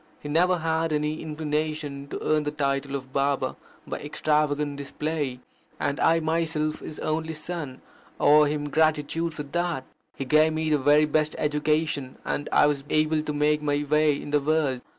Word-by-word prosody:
He - - -8
never 180 +4 +3
had 160 0 0
any 150 +1 -1
inclination 150 -2 -3
to - - -5
earn 155 0 +2
the 150 - -2
title 140 -1 -1
of 130 -1 -7
Baba 140 0 0 0.3
by - - -5
extravagant 150 -1 0
display, 145 -2 -3 0.4
and 140 +2 -1
I 165 0 +4
myself 160 -1 -1
his 155 - -8
only 160 +1 -2
son, 150 -4 -5 0.4
owe 150 +1 +6
him 145 0 -2
gratitude 155 +2 +1
for 150 - -4
that. 170 -2 -2 0.3
He 135 - -4
gave 155 +4 +4
me 160 0 -1
the 150 - +3
very 145 +3 +5
best 155 0 0
education, 150 -2 0
and 145 - -2
I - - +5
was 145 -2 0
able 155 0 +2
to 150 - -3
make 150 +1 +2
my 145 0 0
way 150 -1 +3
in 145 - -7
the 150 -1 +3
world. 145 -4 +1
150 Hz, 170 wpm, -26 LUFS, 145-155 Hz, 0.4 s, owe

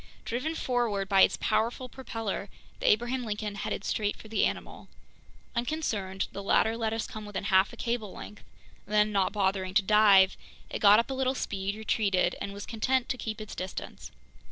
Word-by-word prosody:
Driven 280 +8 -2
forward 235 -9 0
by 195 -1 +4
its - - +5
powerful 240 +3 0
propeller, 225 -6 -5 0.3
the - - -1
Abraham 240 +4 +1
Lincoln 210 -2 -3
headed 200 0 -4
straight 210 -1 -1
for 220 - -13
the 225 - +2
animal. - - -7 0.7
Unconcerned, 225 -8 -2
the 200 - -6
latter 220 +3 +2
let 225 -1 -1
us 225 0 -2
come 215 - -8
within 205 -2 -5
half 190 0 +3
a 235 - -12
cable 230 -4 -2
length; 210 - -10 0.4
then, 210 0 +3
not 195 -2 +1
bothering 190 -2 -1
to 210 - +5
dive, 200 -2 +6 0.4
it - - -3
got 205 0 +7
up 235 +4 +1
a - - -1
little 265 0 0
speed, 200 -4 -3
retreated, 210 -3 +1
and 200 - -3
was 200 +1 -7
content 255 +3 0
to 250 - -1
keep 220 -1 -4
its 215 -1 -7
distance. 185 0 -6
215 Hz, 180 wpm, -29 LUFS, 200-235 Hz, 0.7 s, got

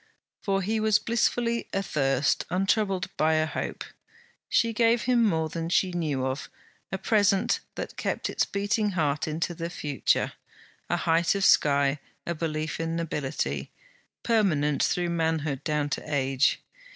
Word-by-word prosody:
For 195 -1 0
he 220 +4 0
was 215 -1 +4
blissfully 235 0 0
athirst, 140 -8 +1
untroubled 195 +1 0
by 155 +1 +3
a 155 0 +2
hope. 155 - -4 0.7
She 230 -1 +2
gave 230 0 +3
him 245 -1 +3
more 160 -7 +1
than 165 +1 -4
she 185 +1 +2
knew 150 -7 -1
of: 130 +2 -3 0.4
a 190 - -1
present 200 0 +2 0.2
that - - -6
kept - - -2
its - - 0
beating 205 +1 0
heart 150 -1 0
into 160 +3 -2
the 170 0 -4
future; 145 -5 0 0.6
a - - +1
height 165 +3 +2
of 195 -1 +1
sky, 140 -1 +4 0.3
a 170 - -1
belief 155 -1 -3
in 165 0 -2
nobility, 135 - -2 0.5
permanent 155 -11 +2
through 175 -1 +1
manhood 160 -4 -1
down 150 -2 0
to - - -1
age. 135 -1 +1
165 Hz, 145 wpm, -27 LUFS, 150-200 Hz, 0.7 s, was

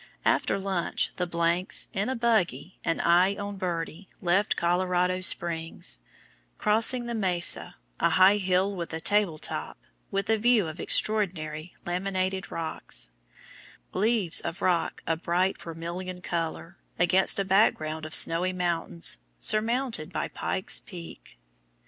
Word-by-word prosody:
After - - +2
lunch, 190 -3 -1
the 180 - -1
s 170 +2 +1
in 200 +5 -1
a 260 - -1
buggy, 220 -6 0
and 165 - 0
I 180 +3 +4
on 200 0 -5
Birdie, 175 0 -4
left 190 +4 +2
Colorado 180 +1 +1
Springs, 165 - 0 0.6
crossing 230 +3 +2
the 235 - -4
Mesa, 185 -6 +1 0.2
a - - +3
high 190 +2 +6
hill 190 0 +1
with 170 -2 -5
a 160 - -3
table 205 -3 +2
top, - - -2 0.3
with 195 0 -2
a 220 - +2
view 235 -3 +4
of 160 +1 -7
extraordinary 170 -6 0
laminated 190 +1 -2
rocks, 160 - -4 0.8
LEAVES 210 -3 +2
of 170 +3 -5
rock 175 -2 0
a 165 - +1
bright 180 +3 0
vermilion 170 +2 -6
color, 170 +1 -4 0.2
against 185 +2 +3
a 195 - 0
background 160 -6 +2
of 155 0 -5
snowy 175 +3 +4
mountains, 170 - +1 0.2
surmounted 225 - +1
by - - -3
Pike's 190 - -2
Peak. 175 -4 -11
185 Hz, 130 wpm, -27 LUFS, 170-200 Hz, 0.8 s, high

